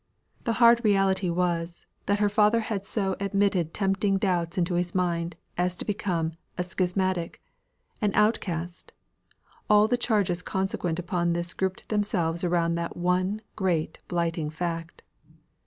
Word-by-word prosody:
The 230 - +1
hard 235 +1 +6
reality 195 -3 +3
was, 170 -1 -1 0.2
that 205 - +3
her 210 0 +3
father 210 +2 +3
had 205 -3 -4
so 195 -4 0
admitted 195 -4 +1
tempting 195 +1 +1
doubts 175 -4 0
into 175 0 +1
his 175 +1 -1
mind 170 -2 0 0.2
as 180 0 +1
to - - -5
become 180 -6 -1 0.3
a 180 - 0
schismatic 185 -1 -1 0.6
an 210 -2 +2
outcast; 180 -5 0 0.8
all 210 0 +6
the 245 - +2
changes 200 -7 +1
consequent 185 -3 -2
upon 175 -1 0
this 170 0 -2
grouped 190 0 -3
themselves 185 -6 0
around 170 -1 +2
that 170 0 -3
one 185 +4 0
great 175 -5 -1
blighting 165 -3 -1
fact. 165 +1 -4
180 Hz, 140 wpm, -27 LUFS, 170-200 Hz, 0.8 s, hard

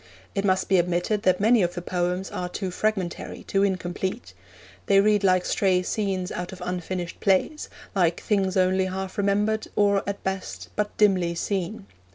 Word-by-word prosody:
It 200 - -1
must 185 -1 +2
be 190 - +4
admitted 175 +4 0
that 185 -2 +3
many 220 +2 +4
of 175 -1 0
the 175 - -3
poems 180 +1 -1
are 180 0 -3
too 185 0 -4
fragmentary, 195 -3 -2
too 195 - 0
incomplete. 190 +2 -2 0.5
They 195 -1 +5
read 210 0 +3
like 185 -2 +3
stray 185 -2 +2
scenes 190 -2 -2
out 180 0 -4
of 190 - -9
unfinished 180 -1 -4
plays, 200 +10 +1 0.2
like 175 -3 +2
things 195 -2 0
only 185 0 +3
half 190 +1 -4
remembered, 205 +2 +1
or, 200 -1 +3
at 200 - -5
best, 190 0 -4
but 210 0 -2
dimly 185 -5 +3
seen. 180 - -3
190 Hz, 170 wpm, -25 LUFS, 180-200 Hz, 0.5 s, They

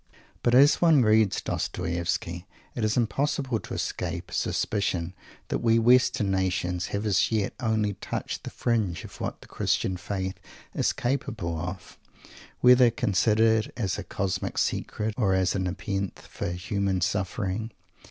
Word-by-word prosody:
But 120 0 +3
as 140 +4 +6
one 160 -6 +6
reads 110 -3 +3
Dostoievsky 85 +1 -2 0.3
it 120 - -3
is 110 +2 +1
impossible 130 0 0
to - - -8
escape - - -3
a - - -9
suspicion 90 -4 -1 0.4
that - - 0
we 115 -1 +3
Western 120 -2 +4
nations 90 -2 0
have 100 +1 -3
as 100 -1 +2
yet 110 -3 0
only 110 -3 0
touched 100 - -5
the - - -5
fringe 110 -8 -1
of - - -11
what - - -4
the - - -14
Christian 95 - 0
Faith 95 +1 -4 0.3
is - - +1
capable 120 -9 -2
of, 90 +3 -6 0.6
whether 125 0 +7
considered 110 +1 +2
as 100 -7 -1
a - - -4
cosmic 95 -2 -3
secret 110 0 -1
or 100 -6 +2
as 95 -1 +2
a 100 - -1
Nepenthe 95 +1 -3
for - - -6
human 95 +1 -1
suffering. 95 +3 -1
100 Hz, 145 wpm, -27 LUFS, 95-115 Hz, 0.6 s, whether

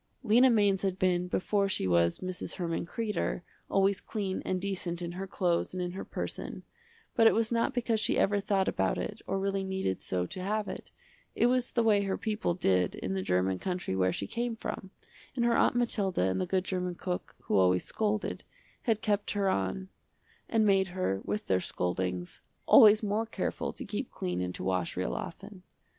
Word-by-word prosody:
Lena 245 +3 +6
Mainz 205 -4 +3
had 190 -2 -1
been, 180 -1 +1
before 195 +2 +1
she 190 - 0
was 85 - +2
Mrs. 185 -1 -4
Herman 170 -2 -2
Kreder, 210 -4 -2 0.3
always 195 0 +2
clean 200 -4 -3
and 185 - -1
decent 185 -3 -3
in 170 -1 -4
her 190 +2 -5
clothes 180 -1 0
and - - -3
in 175 - -3
her 190 - -6
person, - - -5 0.5
but 225 -1 +6
it - - +5
was 225 +1 +1
not 230 +1 +1
because 230 -2 +1
she - - +1
ever 205 +1 +3
thought 195 -1 +1
about 95 0 +1
it 210 - -4
or 195 - 0
really 195 0 -1
needed 190 - -2
so 90 -1 -1
to 185 - -7
have 210 +2 -1
it, - - -7 0.5
it - - +3
was 250 0 +1
the 235 - +2
way 210 -2 +4
her 195 -1 -1
people 210 -5 -1
did 90 - +1
in 95 - -3
the 95 - -1
german 90 0 +1
country 180 - -2
where 95 -1 +2
she 100 - -3
came 235 - -2
from, 195 -3 -5 0.5
and 240 -2 +1
her 235 0 +3
Aunt - - +3
Mathilda 205 - +1
and - - -1
the 185 - -1
good 185 0 +1
german 180 -2 -2
cook 180 0 -4
who - - -1
always 90 -1 +4
scolded, 215 -1 -1 0.4
had 220 -3 0
kept 205 -1 0
her 200 -2 +1
on 100 - -1 0.6
and 225 -1 +3
made 195 -2 +4
her, 95 - 0
with 105 +1 -2
their 95 -1 +2
scoldings, 90 0 -3 0.2
always 215 0 +8
more 215 +2 0
careful - - -3
to - - -7
keep - - -4
clean 90 0 -3
and 90 0 -3
to - - -6
wash 90 -2 -1
real - - -1
often. - - -7
190 Hz, 200 wpm, -30 LUFS, -, 0.6 s, always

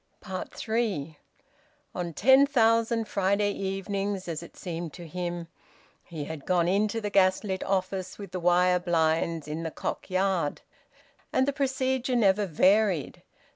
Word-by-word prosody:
THREE. 205 -10 -2 0.7
On 175 -1 -3
ten 265 - +5
thousand 230 -3 +2
Friday 200 +1 +1
evenings, 195 0 -3
as 165 -2 -4
it 170 - -13
seemed 170 -3 -5
to 175 - -9
him, 175 0 -4 0.6
he 160 -4 -6
had 155 -2 -8
gone 175 -2 +2
into 205 +4 +1
the 205 -2 -4
gas 190 0 +3
lit 190 -2 -3
office 190 -1 -2
with 200 -3 -9
the 185 - -3
wire 180 +1 +3
blinds, 165 -2 0
in 155 +2 -4
the 165 - -3
Cock - - -5
Yard. 185 -5 0 0.7
And 260 - +2
the 280 - +1
procedure 265 -2 0
never 205 -3 +3
varied. 190 0 +2
190 Hz, 140 wpm, -27 LUFS, 170-210 Hz, 0.7 s, ten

